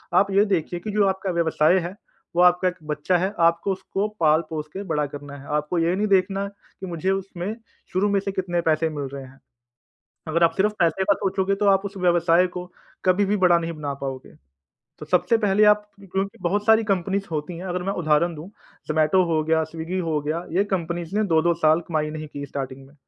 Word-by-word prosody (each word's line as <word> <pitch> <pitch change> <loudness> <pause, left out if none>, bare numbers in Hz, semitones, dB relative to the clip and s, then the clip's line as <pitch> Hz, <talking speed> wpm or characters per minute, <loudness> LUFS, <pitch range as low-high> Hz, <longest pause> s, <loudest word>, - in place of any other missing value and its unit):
आप 190 +2 +5
ये 200 +2 +4
देखिए 175 -3 -1
कि 210 - -4
जो 205 0 +3
आपका 190 0 -1
व्यवसाय 170 0 +3
है 175 +1 -5 0.4
वो - - +5
आपका 180 +1 +4
एक 180 - -1 0.2
बच्चा 150 +5 +1
है 190 +4 -1
आपको 170 +3 0
उसको 195 +2 -2
पाल-पोस 155 0 +1
के 195 +1 -5
बड़ा 150 -1 +1
करना 145 0 -8
है 140 - -12
आपको 150 +4 -1
ये 170 +2 +2
नहीं 210 +2 0
देखना 195 0 +2
कि 190 - -12
मुझे 175 +2 -1
उसमें 195 +1 -3 0.4
शुरू 195 +3 +2
में 200 - +2
से 200 - -3
कितने 180 -2 -1
पैसे 160 +1 +2
मिल 145 -2 -4
रहे 140 -1 -6
हैं। 130 +1 -15 0.9
अगर 165 +2 +1
आप 165 - +3
सिर्फ 210 +2 +2
पैसे 170 +3 +2
का 200 +1 +4
सोचोगे 195 0 0
तो - - +3
आप 195 0 +4
उस 200 0 -8
व्यवसाय 175 0 +3
को 180 0 -4 0.4
कभी 185 +2 +3
भी 210 +2 +1
बड़ा 175 -1 +5
नहीं 165 0 -3
बना 145 -3 -4
पाओगे। 130 - -6 0.6
तो - - -9
सबसे 230 - +2
पहले 210 -1 +3
आप 210 0 -15 0.2
क्योंकि 195 +1 -2
बहुत 205 +4 0
सारी 220 0 +5
कंपनीज़ 195 +1 0
होती 155 +3 -3
हैं 180 - -7
अगर 180 0 -2
मैं 195 - -1
उदाहरण 155 +3 +2
दूँ 160 +5 -9 0.4
ज़ोमैटो 155 +4 +3
हो 155 -1 +2
गया, 160 0 +2
स्विग्गी 165 +3 -5
हो 150 -1 +1
गया, 160 +4 -2
ये 190 +4 +2
कंपनीज़ 170 +1 -4
ने 215 - +2
2-2 170 +2 +3
साल 155 +2 +5
कमाई 155 -2 -1
नहीं 155 0 -6
की 140 0 -6
स्टार्टिंग 135 0 -6
में। 140 - -20
175 Hz, 215 wpm, -23 LUFS, 155-195 Hz, 0.9 s, आप